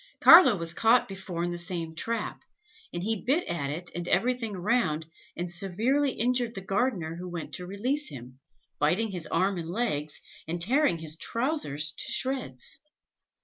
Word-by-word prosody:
Carlo 320 - +9
was 165 -1 -2
caught 230 +5 +4
before 190 -3 -5
in 175 - -1
the 175 - -2
same 170 -2 -4
trap, 230 +8 -3 0.5
and 175 - -4
he 220 0 -1
bit 285 +8 +2
at 155 -5 -2
it 170 +4 -3
and 175 0 -3
at - - -2
everything 230 +1 +1
around, 180 -5 0 0.3
and 175 0 -2
severely 225 +10 +1
injured 240 0 0
the 195 - -3
gardener 195 -6 -1
who 180 +1 -6
went 170 -2 -6
to 180 -1 -5
release 255 +10 -2
him, 125 0 -11 0.4
biting 190 +9 +1
his 180 -4 -5
arm 185 +2 +1
and 165 -1 -6
legs, 155 -8 -2 0.3
and 170 +2 -3
tearing 255 - +3
his 160 -1 -7
trousers 230 - -1
to - - -4
shreds. 255 - -1
185 Hz, 170 wpm, -28 LUFS, 165-240 Hz, 0.5 s, Carlo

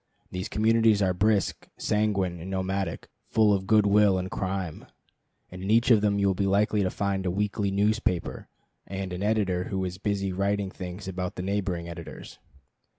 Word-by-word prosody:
These 90 +3 -4
communities 110 -1 +3
are 95 -1 +2
brisk, 100 +2 +1
sanguine, 100 -5 0
and 85 +4 -7
nomadic, 95 -2 -2 0.2
full 110 -2 +4
of 95 -1 -1
good 110 -2 +5
will 100 -1 +4
and 95 0 -3
crime; 95 -4 -3 0.6
and 90 0 -8
in 95 - -4
each 115 +3 +4
of 110 -3 +6
them 105 -1 +2
you 100 - +1
will 95 - +3
be 100 +1 0
likely 105 +2 +2
to 95 - +1
find 100 -1 -1
a 95 - 0
weekly 100 +2 -1
newspaper, 100 -2 0 0.4
and 95 -1 -4
an 90 - -4
editor 100 -4 +1
who 95 -2 -2
is 90 +1 -5
busy 100 -2 -1
writing 100 +1 0
things 90 +1 -7
about 90 -1 -4
the 90 - -4
neighboring 95 -3 -2
editors. 85 -1 -9
100 Hz, 180 wpm, -27 LUFS, 95-105 Hz, 0.6 s, of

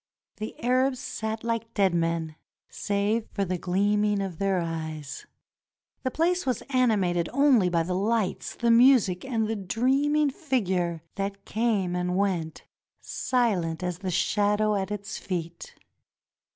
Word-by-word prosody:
The 215 0 -6
Arabs 255 +2 +2
sat 220 -2 -4
like 230 -1 -3
dead 195 -3 +3
men 165 -2 -1 0.4
save 205 +2 -1
for 200 - -2
the 185 -1 -2
gleaming 205 +3 +1
of 190 -4 -4
their 195 -1 +1
eyes. 160 -4 -5 0.7
The 260 - -1
place 350 +5 +1
was 255 -4 -1
animated 200 -10 +2
only 260 -8 +4
by 170 -1 +1
the 180 +2 -3
lights, 205 +1 -1
the 235 -1 +2
music, 230 -7 +5
and 230 -5 -1
the 225 - -1
dreaming 270 +9 +1
figure 190 - -1
that 200 0 -4
came 210 -5 0
and 180 0 -1
went 180 -5 -1 0.4
silent 190 -10 -1
as 180 -1 -3
the 185 - -3
shadow 210 +4 +1
at 195 -2 -1
its 210 0 -5
feet. 170 -2 -5
200 Hz, 140 wpm, -26 LUFS, 180-235 Hz, 0.7 s, music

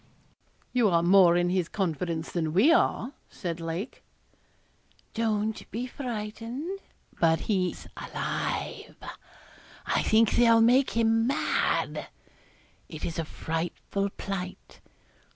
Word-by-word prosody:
'You 240 -4 +4
are 170 -2 +3
more 175 -1 +6
in 175 0 +1
his 185 -2 0
confidence 170 -3 -2
than 160 -3 -1
we 220 - +5
are,' 280 -6 +1 0.2
said 170 -2 -5
Lake. 165 +8 -5 1.1
'Don't 220 -1 -1
be 235 +4 -3
frightened 245 - -5 0.4
but 165 -1 +3
he's 185 -4 -1
alive; - - -4 0.9
I - - +1
think 220 0 +4
they'll 230 -1 +5
make 245 +4 +5
him 225 0 +3
mad. 275 - 0 0.8
It 155 - -6
is 165 0 -4
a 165 - -1
frightful 170 +6 -3
plight. 190 -2 -7
200 Hz, 110 wpm, -28 LUFS, 170-230 Hz, 1.1 s, more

